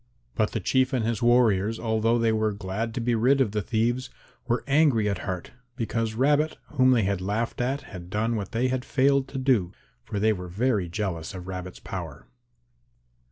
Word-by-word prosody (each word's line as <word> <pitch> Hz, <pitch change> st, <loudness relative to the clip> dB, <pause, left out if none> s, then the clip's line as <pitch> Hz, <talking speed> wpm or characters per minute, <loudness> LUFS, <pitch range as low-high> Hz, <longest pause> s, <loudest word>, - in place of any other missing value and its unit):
But 110 Hz, -1 st, 0 dB
the 115 Hz, -, 0 dB
Chief 130 Hz, +6 st, +1 dB
and 120 Hz, -4 st, +1 dB
his 115 Hz, -2 st, -1 dB
warriors, 115 Hz, -3 st, +3 dB
although 115 Hz, +1 st, +1 dB
they 115 Hz, -1 st, +2 dB
were 110 Hz, -1 st, +1 dB
glad 105 Hz, +4 st, -4 dB
to -, -, -1 dB
be 120 Hz, +1 st, 0 dB
rid 125 Hz, +5 st, +3 dB
of 125 Hz, -6 st, +2 dB
the 105 Hz, 0 st, -1 dB
thieves, 120 Hz, +4 st, 0 dB, 0.4 s
were 120 Hz, -1 st, 0 dB
angry 140 Hz, -7 st, +3 dB
at 100 Hz, -, -1 dB
heart 90 Hz, -2 st, -5 dB, 0.2 s
because 115 Hz, -2 st, -2 dB
Rabbit 145 Hz, +5 st, +2 dB
whom 130 Hz, -3 st, +3 dB
they 120 Hz, -4 st, +4 dB
had 95 Hz, -1 st, -1 dB
laughed 105 Hz, +6 st, -2 dB
at 135 Hz, +4 st, -1 dB
had 90 Hz, -2 st, -10 dB
done 110 Hz, +4 st, 0 dB
what 100 Hz, -3 st, -4 dB
they 125 Hz, +3 st, +1 dB
had 130 Hz, -1 st, -1 dB
failed 140 Hz, 0 st, +2 dB
to 135 Hz, -, -7 dB
do, 125 Hz, -9 st, +1 dB, 0.3 s
for 100 Hz, -, -4 dB
they 110 Hz, +1 st, +3 dB
were 90 Hz, -2 st, -6 dB
very 100 Hz, -1 st, 0 dB
jealous 90 Hz, -2 st, -3 dB
of 90 Hz, 0 st, -8 dB
Rabbit's 90 Hz, -1 st, -6 dB
power. -, -, -7 dB
115 Hz, 195 wpm, -26 LUFS, 100-130 Hz, 0.4 s, they